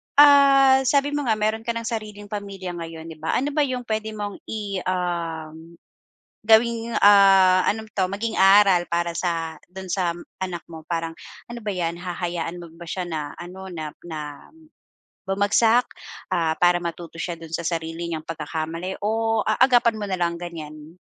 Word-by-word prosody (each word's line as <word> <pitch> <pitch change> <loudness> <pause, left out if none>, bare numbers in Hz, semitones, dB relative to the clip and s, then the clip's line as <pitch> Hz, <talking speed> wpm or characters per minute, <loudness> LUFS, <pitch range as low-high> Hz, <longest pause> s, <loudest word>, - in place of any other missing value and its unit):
ah, 275 -2 +7
sabi 280 +2 +2
mo 290 -2 -2
nga 220 - +3
meron 215 +2 -1
ka 235 - 0
ng 230 0 -4
sariling 210 -3 -6
pamilya 200 -3 -5
ngayon, 165 0 -8
di 155 - -12
ba? 160 - -1
Ano 280 +3 0
ba 295 - -1
yung 250 -1 -3
puwede 220 -1 -3
mong 205 -1 -5
i 205 -3 -3
um, 165 -3 -3 0.7
gawing, 230 +1 +3
ah, 195 -2 +6
ano 220 +1 0
'to 190 -2 0
maging 210 +4 -3
aral 195 -2 +6
para 170 0 0
sa 165 -3 -2
dun 190 0 -9
sa 175 -2 0 0.3
anak 175 -2 -4
mo, 160 -1 -10
parang 165 -1 -2 0.4
ano 240 - -6
ba 205 -2 -3
'yan 170 -1 -2
hahayaan 175 -1 -4
mo 170 - -11
ba 170 - -10
siya 185 +2 -3
na 155 -3 -4
ano, 185 +2 -9
na 155 -3 -5 0.2
na 150 -3 -7 0.8
bumagsak? 220 +5 +3 0.5
Ah, 165 -3 +1
para 175 0 +3
matuto 170 0 -6
siya 170 0 -4
dun 165 -1 -11
sa 170 - -1
sarili 165 0 -3
niyang 160 -2 -5
pagkakamali? 165 +3 -4
O, 225 +1 +1
aagapan 240 +1 +4
mo 210 - -4
na 185 - -1
lang 170 -1 0
ganyan? 155 -1 -9
185 Hz, 170 wpm, -23 LUFS, 165-215 Hz, 0.8 s, ah